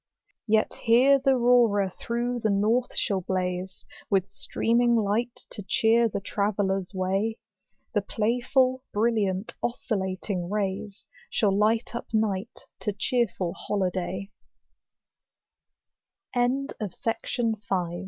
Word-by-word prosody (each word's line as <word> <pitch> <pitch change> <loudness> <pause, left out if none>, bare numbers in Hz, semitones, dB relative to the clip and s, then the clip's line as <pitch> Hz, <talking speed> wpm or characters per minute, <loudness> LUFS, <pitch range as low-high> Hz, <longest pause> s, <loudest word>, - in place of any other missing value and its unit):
Yet 220 0 +2
here 260 +5 +6
th' 270 - -8
Aurora 240 -6 +4
through 240 +4 -2
the 220 - 0
north 215 +5 +1
shall 195 -3 0
blaze, 185 0 -3 0.2
With 195 -2 +1
streaming 235 +1 +1
light 225 +2 0
to 210 - -7
cheer 225 +4 +3
the - - -3
traveller's 195 -1 -1
way; 195 +4 -1 0.6
The 205 - +2
playful, 250 +5 +1
brilliant, 205 -3 0
oscillating 190 -5 -2
rays, 200 0 -3 0.2
Shall 200 -3 +2
light 220 +4 +2
up 235 - -5
night 215 -1 -1 0.2
to 210 - -2
cheerful 195 -5 0
holid 195 -3 -1
210 Hz, 95 wpm, -26 LUFS, 195-235 Hz, 0.6 s, here